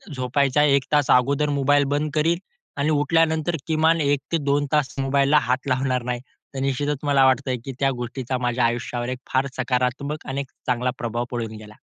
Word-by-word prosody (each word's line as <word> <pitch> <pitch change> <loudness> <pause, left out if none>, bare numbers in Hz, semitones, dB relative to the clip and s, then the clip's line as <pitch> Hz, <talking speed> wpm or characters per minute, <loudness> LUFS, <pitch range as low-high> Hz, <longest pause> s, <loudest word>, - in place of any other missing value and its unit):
झोपायचा 135 +2 +1
1 140 -2 +3
तास 145 -3 +3
अगोदर 140 +4 +3
मोबाईल 145 +1 +3
बंद 150 +1 -1
करीन 165 +3 +2 0.4
आणि 140 +2 +1
उठल्यानंतर 160 +2 +2
किमान 160 +1 +2
1 145 -1 +2
ते 165 - +2
2 145 +1 +2
तास 150 -4 +1
मोबाईलला 140 +2 +3
हात 130 +2 0
लावणार 130 -1 0
नाही. 125 0 -2 0.4
तर - - -3
निश्चितच 140 +2 -1
मला 140 -2 +4
वाटतंय 130 0 +2
की 135 - -4
त्या 135 -1 +2
गोष्टीचा 125 +1 -3
माझ्या 120 0 +1
आयुष्यावर 120 +1 -2
एक 130 0 -4
फार 130 +1 +2
सकारात्मक 130 +3 -1
आणि 135 0 -2
एक 135 - -10 0.2
चांगला 125 0 +1
प्रभाव 120 0 -3
पडून 115 -3 -4
गेला. 105 0 -12
135 Hz, 180 wpm, -23 LUFS, 125-145 Hz, 0.4 s, मला